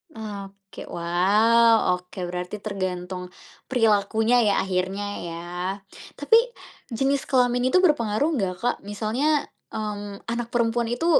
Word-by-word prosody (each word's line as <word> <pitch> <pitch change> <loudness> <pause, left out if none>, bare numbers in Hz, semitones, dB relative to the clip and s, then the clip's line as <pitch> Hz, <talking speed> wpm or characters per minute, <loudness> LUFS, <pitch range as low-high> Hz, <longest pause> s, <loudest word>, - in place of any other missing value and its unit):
Oke, 200 -2 -9
wow, 210 +6 +3
oke 180 +1 -13
berarti 180 +3 -5
tergantung 185 -2 -4 0.4
perilakunya 225 0 +3
ya 200 - +3
akhirnya 190 +2 -2 0.2
ya. 165 0 -6 0.8
Tapi, 450 +11 +5 0.5
jenis 270 +3 0
kelamin 245 -1 +2
itu 365 +8 +3
berpengaruh 285 - +2
enggak, 195 - -1
Kak? 245 - +2
Misalnya, 245 +9 0 0.2
mmm, 205 -2 -5
anak 235 0 -2
perempuan 235 0 0
itu 245 +8 -2
215 Hz, 115 wpm, -24 LUFS, 195-245 Hz, 0.8 s, Tapi